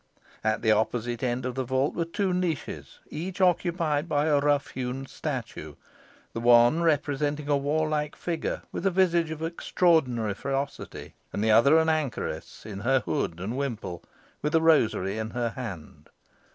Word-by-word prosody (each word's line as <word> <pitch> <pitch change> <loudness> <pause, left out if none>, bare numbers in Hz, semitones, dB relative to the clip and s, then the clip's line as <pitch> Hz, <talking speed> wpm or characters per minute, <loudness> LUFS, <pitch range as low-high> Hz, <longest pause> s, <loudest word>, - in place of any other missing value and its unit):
At 110 +1 0
the 110 - +4
opposite 115 +2 0
end 125 0 -1
of 125 - -2
the 130 +1 -2
vault 130 +3 0
were 170 - -1
two 185 +3 -1
niches, 180 -4 -3
each 175 +5 -5
occupied 170 -4 +1
by 145 -1 +2
a 150 -2 +3
rough 145 -1 +1
hewn 130 +1 -4
statue - - -5 0.6
the - - -3
one 120 +6 +5
representing 145 -2 0
a 145 - +3
warlike 150 +1 0
figure, 170 -2 -3
with - - -5
a - - +5
visage 175 -3 +2
of 160 0 -5
extraordinary 160 - +1
ferocity, 140 +5 -4 0.2
and 100 - -2
the 110 - +3
other 140 +8 +6
an 160 0 +3
anchoress, 155 -4 -2
in 100 -3 -6
her 130 +4 +2
hood 85 -6 -2
and 100 +7 -4
wimple, 115 -10 -4 0.4
with 150 +2 0
a 160 - +5
rosary 110 - +3
in 110 0 -3
her 120 0 -1
hand. 105 -11 -8
140 Hz, 165 wpm, -27 LUFS, 120-160 Hz, 0.6 s, other